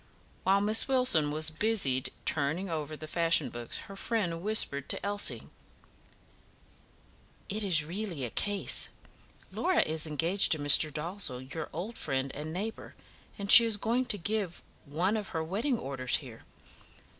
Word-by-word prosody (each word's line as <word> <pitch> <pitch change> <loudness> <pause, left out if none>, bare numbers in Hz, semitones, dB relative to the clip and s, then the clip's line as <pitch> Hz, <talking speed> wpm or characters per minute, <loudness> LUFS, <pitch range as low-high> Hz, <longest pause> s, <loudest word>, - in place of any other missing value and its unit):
While 195 +1 +2
Miss 215 +2 +3
Wilson 250 - +2
was 155 +2 -1
busied 155 - +1 0.2
turning 160 +6 -2
over 155 -1 -5
the 155 - -9
fashion 165 -3 +1
books, 120 -1 -6
her 195 - -11
friend 195 -6 -3
whispered 175 -9 +2
to - - +1
Elsie: 205 0 +2 2.1
"It 210 +2 -2
is 170 -7 +2
really 175 -5 -5
a 115 - -7
case; 205 -1 -1 0.6
Laura 370 -2 +1
is 160 0 -3
engaged 165 +6 +3
to - - 0
Mr. 145 +1 +6
Dalzell, 150 -5 -5
your 160 - -6
old 195 +9 -7
friend 135 0 -3
and 150 +2 -6
neighbour, 205 +6 -6 0.4
and 200 -1 0
she 235 - +12
is 225 -2 0
going 240 +5 -1
to 215 - +2
give 200 -1 -4 0.2
one 175 +9 -1
of 210 -3 -4
her 160 - -2
wedding 225 - -2
orders 130 - -1
here. 125 -6 -12
170 Hz, 150 wpm, -29 LUFS, 150-205 Hz, 2.1 s, she